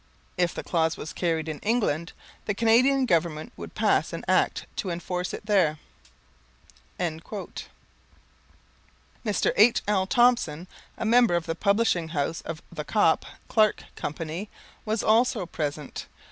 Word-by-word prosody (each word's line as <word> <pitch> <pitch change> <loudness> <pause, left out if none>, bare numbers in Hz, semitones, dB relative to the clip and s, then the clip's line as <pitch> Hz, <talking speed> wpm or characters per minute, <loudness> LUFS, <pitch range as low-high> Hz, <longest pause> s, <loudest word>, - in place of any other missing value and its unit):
If 175 -2 0
the - - -4
clause 160 -2 0
was 155 - -7
carried 165 -3 -1
in 155 -2 -4
England, 205 -8 0 0.3
the 205 - -1
Canadian 255 +5 +4
Government 170 0 0
would - - -9
pass - - +2
an - - -5
Act - - +2
to 195 - -2
enforce 180 +1 -3
it - - -7
there." 185 -8 +3 1.2
Mr. 175 +4 -5 1.9
H.L. 210 -3 +4
Thompson, 240 -9 +3 0.3
a - - -3
member 230 -4 +5
of 170 -1 -1
the 165 - -1
publishing 200 -2 +1
house 160 0 -2
of 165 0 -7
The 160 -3 -5
Copp, 165 0 +2 0.2
Clark 215 -1 +3
Company, 165 +6 -5 0.4
was 215 0 -1
also 225 -2 +3
present. 150 -3 -5
180 Hz, 130 wpm, -26 LUFS, 160-220 Hz, 1.9 s, member